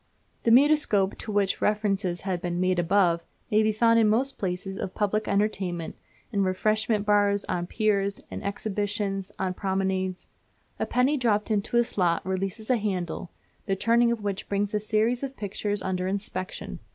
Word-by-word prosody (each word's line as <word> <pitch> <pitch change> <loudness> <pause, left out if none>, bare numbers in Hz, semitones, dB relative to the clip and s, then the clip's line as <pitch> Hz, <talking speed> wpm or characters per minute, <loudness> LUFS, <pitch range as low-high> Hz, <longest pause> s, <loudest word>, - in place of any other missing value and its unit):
The - - +4
Mutoscope, 250 -7 +4
to 220 - -5
which 200 -2 +1
reference 210 -2 +1
has 175 -3 -3 0.2
been 175 -1 -3
made 185 0 +2
above, 175 -1 +3 0.3
may 215 +1 +5
be 215 0 +3
found 230 +1 +4
in 220 -2 +4
most 260 +5 +1
places 190 0 -3
of 190 - -4
public 210 +1 0
entertainment, 195 -5 -1 0.4
in 200 -3 +1
refreshment 215 +3 +1
bars, 205 -1 +3
on 175 -1 -2
piers, 200 -1 0
in - - -5
exhibitions, 200 -1 -2
on 185 -1 -1
promenades. 190 -1 -1 0.5
A - - -1
penny 260 +4 +2
dropped 220 -4 +1
into 210 +3 +1
a 240 - +5
slot 180 -7 0
releases 195 +5 -2
a 250 - +4
handle, 185 -4 -3 0.4
the 195 - +1
turning 235 +4 +3
of 230 -3 -3
which 200 -1 -3
brings 200 +1 0
a 210 - +2
series 220 +3 +1
of 275 -1 -5
pictures 205 0 -3
under 185 -1 -1
inspection. 195 -1 -4
205 Hz, 165 wpm, -26 LUFS, 190-215 Hz, 0.5 s, may